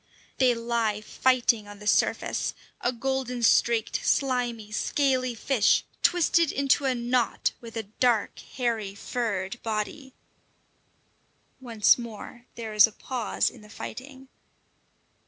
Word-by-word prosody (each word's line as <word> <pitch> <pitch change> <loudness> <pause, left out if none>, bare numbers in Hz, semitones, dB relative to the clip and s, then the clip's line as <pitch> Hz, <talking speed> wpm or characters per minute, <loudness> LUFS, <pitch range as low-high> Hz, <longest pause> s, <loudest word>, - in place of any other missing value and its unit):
They 255 -2 +4
lie 230 -2 -1
fighting 235 -2 +1
on 205 0 -10
the 210 - -12
surface - - +1 0.3
a 245 - +2
golden 250 -1 -3
streaked, 230 -1 +2
slimy, 245 -5 0
scaly 255 +1 0
fish 230 -1 +2 0.2
twisted 335 -2 +3
into 280 0 +1
a 260 -1 +1
knot 240 0 0
with 230 -1 -9
a 225 - -2
dark, 220 +1 0
hairy, 225 -6 -3
furred 210 -2 -3
body! 225 +5 -4 1.4
Once 235 -3 +3
more 235 +1 -9
there 225 -2 -6
is 210 +1 +7
a - - -12
pause 245 +1 -2
in 240 - -15
the 210 - -15
fighting. 265 +4 -9
235 Hz, 120 wpm, -26 LUFS, 220-255 Hz, 1.4 s, is